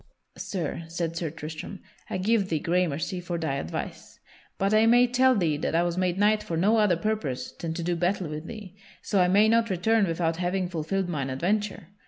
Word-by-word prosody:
"Sir," 170 -3 -4
said 165 0 -3
Sir 170 -1 -2
Tristram, 155 +5 -7 0.3
"I - - -2
give 200 +1 +1
thee 160 - +1
gramercy 175 +1 -1
for 175 -1 -3
thy 160 -4 -2
advice. 80 - -6 0.4
But 195 +2 +1
I 220 +1 +5
may 245 +2 +6
tell 255 +1 +3
thee 165 -7 +1
that 160 - -2
I 170 - +3
was 175 -1 -1
made 185 -1 0
knight 210 +1 +3
for 165 - -4
no 205 +7 +3
other 205 -6 +3
purpose 210 -11 -2
than 165 -1 -5
to 170 - -3
do 175 +1 0
battle 180 +1 0
with 155 +2 -6
thee; 210 -5 -9 0.3
so 200 -3 +2
I 180 - +4
may 205 +4 +5
not 230 +1 +3
return 200 +3 +2
without 165 -1 -1
having 180 +1 -1
fulfilled 175 +3 -2
mine 140 -6 -2
adventure. 185 +6 -1
180 Hz, 205 wpm, -26 LUFS, 165-205 Hz, 0.4 s, may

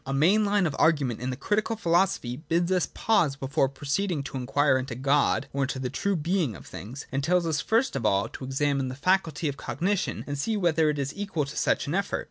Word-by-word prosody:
A 135 +1 -3
main 185 +10 +4
line 205 -2 +2
of 155 - -1
argument 140 -8 +2
in 125 +2 -3
the 130 - -2
Critical 210 - -1
Philosophy 170 - +1
bids 170 +3 0
us 180 -2 +2
pause 165 -11 +2
before 135 0 0
proceeding 145 +4 -2
to 140 - -8
inquire 130 +1 +2
into 130 -2 -5
God 140 +3 +2
or 140 - -1
into 130 - -4
the 130 -1 -3
true 200 +7 0
being 165 - 0
of - - -12
things, 125 +8 -8
and 135 +1 -1
tells 175 +3 +2
us 160 -3 0
first 230 - +1
of 135 - -2
all 100 -2 +2
to - - -9
examine 135 0 0
the 130 - -5
faculty 165 0 +1
of 140 -1 -3
cognition 190 +6 -2
and 145 -1 -4
see 220 +8 0
whether 165 -4 +2
it 150 - -1
is 140 0 -2
equal 195 -7 -2
to 140 +2 -9
such - - +1
an 145 - -3
effort. 200 +1 0
150 Hz, 230 wpm, -27 LUFS, 135-180 Hz, -, main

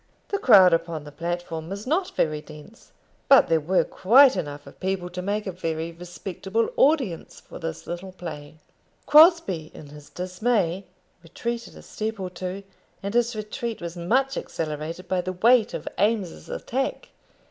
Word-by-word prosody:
The 400 - -1
crowd 195 - +7
upon 165 -2 -1
the 145 - -11
platform 165 0 -4
was 200 +2 -6
not 345 +7 -1
very 155 -1 0
dense, 155 +9 -14 0.4
but 275 - +7
there 165 -1 +4
were 175 +5 +2
quite 260 +7 +5
enough 145 -1 -5
of - - -15
people 185 -2 -2
to 180 +1 -5
make 205 +3 -2
a 190 - -3
very 165 -2 -3
respectable 190 +5 -3
audience 265 - +1
for - - -12
this 165 -1 -6
little 175 +2 -6
play. 155 -5 -8 0.5
Crosbie, 300 - +5
in 145 - -11
his 150 0 -13
dismay, 185 0 -1 0.4
retreated 235 +8 -5
a - - -13
step 220 0 -4
or 185 -1 -4
two, 185 +2 -6 0.4
and 200 +1 -3
his 240 0 +1
retreat 220 +2 -4
was 170 0 -6
much 255 +11 0
accelerated 160 +3 -5
by 185 0 0
the 185 +1 -4
weight 225 +4 +4
of - - -7
Eames's 205 -4 0
attack. 270 - -3
185 Hz, 160 wpm, -25 LUFS, 165-230 Hz, 0.5 s, crowd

